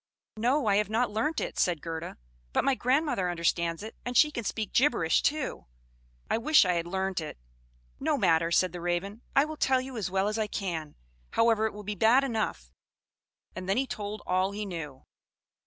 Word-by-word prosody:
"No, 250 +5 +2
I 200 -2 +3
have 210 -1 +1
not 225 +1 +1
learnt 295 +10 0
it," - - -4
said 175 -4 +2
Gerda; 165 +1 -6 0.4
"but - - +2
my 275 - +4
grandmother 255 - +1
understands 170 0 0
it, 220 - -8
and 245 0 -1
she 300 - +6
can 235 - -4
speak 215 0 -3
gibberish 235 - +3
too. 295 - -1 0.6
I - - 0
wish 300 -1 +5
I 180 - +2
had 170 0 -1
learnt 190 0 -1
it." 155 - -7 0.6
"No 300 +1 +1
matter," 165 -6 +3
said 180 +1 +3
the 175 0 -7
Raven; 175 +6 -2
"I 275 - +5
will 310 0 -7
tell 265 -2 +3
you 260 -1 -6
as 200 -5 -2
well 190 +2 +1
as 215 +1 -1
I 215 - 0
can; 170 -8 -4 0.4
however, 225 -1 +3
it - - -7
will 210 0 -9
be 210 +1 -3
bad 225 +7 +4
enough." 220 - -2 0.8
And 185 0 -6
then 195 - +2
he 270 - +2
told 215 -4 -5
all 185 +2 +1
he 210 +1 -4
knew. 150 -8 -7
210 Hz, 200 wpm, -28 LUFS, 175-245 Hz, 0.8 s, she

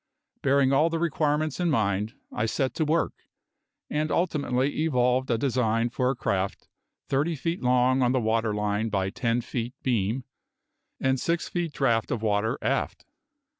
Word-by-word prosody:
Bearing 140 0 +3
all 155 +4 +4
the 165 - -3
above 165 - -1
requirements 155 -1 0
in 175 -1 +1
mind, 105 -5 0 0.2
I 110 - -1
set 130 +3 -1
to 160 - 0
work, 160 +2 +1 0.7
and 155 +1 -1
ultimately 145 -5 0
evolved 125 -3 +2
a 115 - +2
design 120 -2 +1
for 125 0 +1
a 135 - 0
craft 100 -5 -2 0.4
thirty 150 +5 +1
feet 165 +5 -3
long 125 +1 +3
on 125 -1 +3
the 130 - +2
water 110 -1 +1
line 105 +1 -1
by 95 -2 -1
ten 120 0 0
feet 120 +1 -4
beam, 120 0 0 0.8
and 130 0 +1
six 170 +5 -1
feet 170 -3 -2
draught 115 -6 +1
of 115 -2 -2
water 110 +3 +1
aft. - - -1
125 Hz, 165 wpm, -26 LUFS, 115-145 Hz, 0.8 s, all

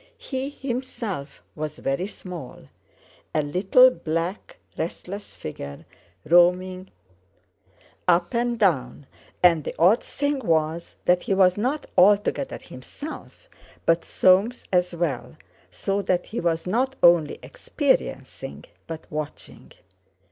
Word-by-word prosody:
He 265 0 -4
himself 240 - -5
was 155 -1 -5
very 135 +8 -1
small, 170 - -9 0.7
a 155 - +2
little 190 - +5
black 165 -1 -4 0.2
restless 185 +5 -6
figure 70 -2 -8 0.4
roaming 180 +2 +3 1.2
up 175 0 +3
and 240 0 0
down; 145 - +1 0.4
and 165 -4 +5
the - - -5
odd 190 +8 +5
thing 285 0 -1
was 165 -5 -1
that 180 0 +4
he 195 - 0
was 185 -1 +5
not 255 +8 -1
altogether 205 +7 +3
himself, 280 - -10 0.4
but 165 0 +3
Soames 195 +7 +3
as 180 -1 +2
well, 170 -4 -3 0.3
so 195 +1 -2
that 180 -2 0
he 225 - -5
was 165 -1 0
not 255 +8 0
only 170 -4 +5
experiencing 70 +2 -2 0.2
but 165 -1 -7
watching. 150 -1 -7
180 Hz, 110 wpm, -24 LUFS, 160-210 Hz, 1.2 s, little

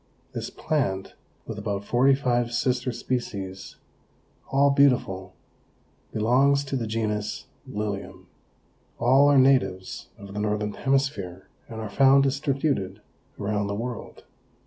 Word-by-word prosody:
This - - -4
plant, 100 -11 -2 0.3
with - - -6
about 100 0 -3
forty 130 +4 +4
five 120 -3 0
sister 125 +1 0
species 105 -6 -4 0.8
all 140 +1 +4
beautiful, 120 -10 +2 0.8
belongs 135 +6 +3
to 140 -1 -4
the 120 -4 -2
genus 105 -1 -2 0.2
Lilium. 105 -1 -5 0.7
All 135 +4 +5
are 140 - +5
natives 95 -9 +2
of 100 -1 -10
the 105 - -4
Northern 105 0 -1
Hemisphere 135 -10 -1 0.2
and 110 -1 -7
are 110 - -4
found 135 +5 +5
distributed 135 -8 0 0.4
around 100 0 -1
the 100 - -2
world. 120 +1 -6
120 Hz, 120 wpm, -26 LUFS, 100-135 Hz, 0.8 s, All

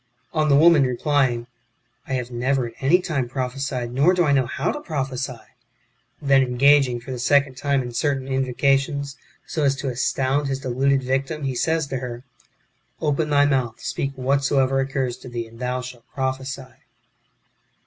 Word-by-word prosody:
On 155 -1 +1
the 140 - +5
woman 160 +1 +6
replying, 130 -2 +1 0.3
" - - -39
I 135 - -3
have 125 -1 -2
never 130 +2 0
at 115 - -7
any 150 +7 +4
time 145 -9 -2
prophesied, 130 -1 -3
nor 150 +8 +4
do 180 - +3
I 150 - +2
know 135 -3 +3
how - - -1
to 295 - -5
prophesy 135 - -3 0.5
;" - - -43
then 135 -1 +6
engaging, 130 0 +4
for 125 +3 -9
the 125 - -4
second 140 +1 +3
time, 140 0 0
in 120 - -6
certain 135 +2 -1
invocations, 135 +2 0 0.3
so 155 - -2
as 140 -1 +3
to 135 0 -3
astound 135 +3 0
his 135 -1 -2
deluded 135 +1 +1
victim, 135 +4 -2
he 135 -1 -1
says 160 +5 0
to 135 -1 -4
her, 125 -1 -6 0.2
^' - - -37 0.5
Open 150 0 0
thy 145 -1 +4
mouth, 130 -5 0
speak 140 0 -3
whatsoever 135 0 +1
occurs 135 -2 -1
to 130 - -11
thee, 120 -1 -4
and 115 +1 -15
thou 125 0 -2
shalt 125 -2 -10
prophesy." 130 -1 -3
135 Hz, 180 wpm, -23 LUFS, 125-140 Hz, 0.5 s, woman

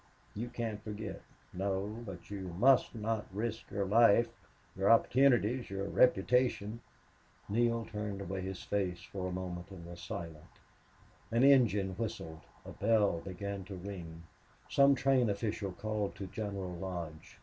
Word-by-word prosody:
You 115 +4 -4
can't 115 -3 -4
forget 105 -2 -6 0.3
no 100 +4 -2
but 95 -3 -9
you 95 -4 -5
must 130 +3 +5
not 110 -1 -2
risk 110 +3 -3
your 100 0 -1
life 115 +2 +5 0.5
your 95 +1 +2
opportunities 120 0 +4
your 100 0 -3
reputation." 115 -1 +3 0.7
Neale 115 +1 +1
turned 105 -2 -4
away 95 0 -4
his 95 -1 -5
face 90 -4 -1
for 95 -2 -5
a - - -3
moment 90 -1 -5
and 95 -4 -10
was 85 0 -9
silent. 80 -3 -7 0.7
An 115 +2 +2
engine 115 -8 +5
whistled; 80 -8 -4 0.2
a - - -8
bell 105 -5 +2
began 100 +2 -5
to 95 - -7
ring; 90 -3 -7 0.4
some 140 0 +5
train 130 -3 +3
official 100 -1 -2
called 105 +1 -3
to 100 - -6
General 100 -1 -4
Lodge. 85 -3 -6
100 Hz, 140 wpm, -33 LUFS, 95-115 Hz, 0.7 s, must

